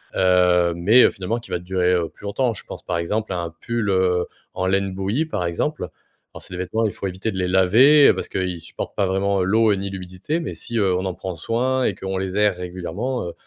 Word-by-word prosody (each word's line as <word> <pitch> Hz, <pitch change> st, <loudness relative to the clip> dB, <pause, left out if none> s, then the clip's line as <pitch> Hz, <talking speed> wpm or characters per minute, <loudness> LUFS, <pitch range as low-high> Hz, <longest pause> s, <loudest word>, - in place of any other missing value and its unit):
heu, 90 Hz, -2 st, +3 dB
mais, 105 Hz, +9 st, +5 dB
heu, -, -, +5 dB
finalement, 100 Hz, +5 st, -3 dB
qui 115 Hz, -, -14 dB
va 90 Hz, -, -1 dB
durer, 90 Hz, 0 st, 0 dB
heu, 85 Hz, -2 st, 0 dB
plus -, -, -21 dB
longtemps. 115 Hz, +4 st, 0 dB
Je -, -, -9 dB
pense, -, -, -9 dB
par -, -, -2 dB
exemple, 105 Hz, +5 st, -2 dB
à 90 Hz, -, -2 dB
un 85 Hz, -, -4 dB
pull, 115 Hz, -3 st, -2 dB
heu, 90 Hz, -2 st, +2 dB, 0.3 s
en 95 Hz, -, -2 dB
laine 95 Hz, 0 st, +1 dB
bouillie, 100 Hz, +11 st, -1 dB
par 120 Hz, -, -3 dB
exemple. 90 Hz, -, -2 dB, 0.4 s
Alors, -, -, -10 dB
c'est -, -, -11 dB
des -, -, -5 dB
vêtements, 110 Hz, +5 st, -1 dB
il 105 Hz, -, -1 dB
faut 100 Hz, -, -4 dB
éviter 95 Hz, +4 st, -3 dB
de -, -, -5 dB
les 90 Hz, -1 st, 0 dB
laver 115 Hz, +11 st, +6 dB
parce -, -, -5 dB
que -, -, -4 dB
il 90 Hz, -2 st, -2 dB
supporte 80 Hz, -, -7 dB
pas 100 Hz, -, +1 dB
vraiment 95 Hz, +1 st, +1 dB
l'eau 110 Hz, +4 st, +3 dB
ni 100 Hz, 0 st, -4 dB
l'humidité, 95 Hz, -, -4 dB
mais 165 Hz, -, -4 dB
si, 115 Hz, -, -5 dB
heu, 95 Hz, -3 st, +2 dB
on 90 Hz, -, -1 dB
en 95 Hz, -, -2 dB
prend 95 Hz, -2 st, -5 dB
soin 125 Hz, +9 st, 0 dB
et 100 Hz, -, 0 dB
qu'on 95 Hz, 0 st, -4 dB
les 95 Hz, +1 st, -3 dB
aère 105 Hz, -2 st, +3 dB
régulièrement, 90 Hz, +7 st, -4 dB
heu, 85 Hz, -, -6 dB
95 Hz, 245 wpm, -22 LUFS, 90-110 Hz, 0.4 s, laver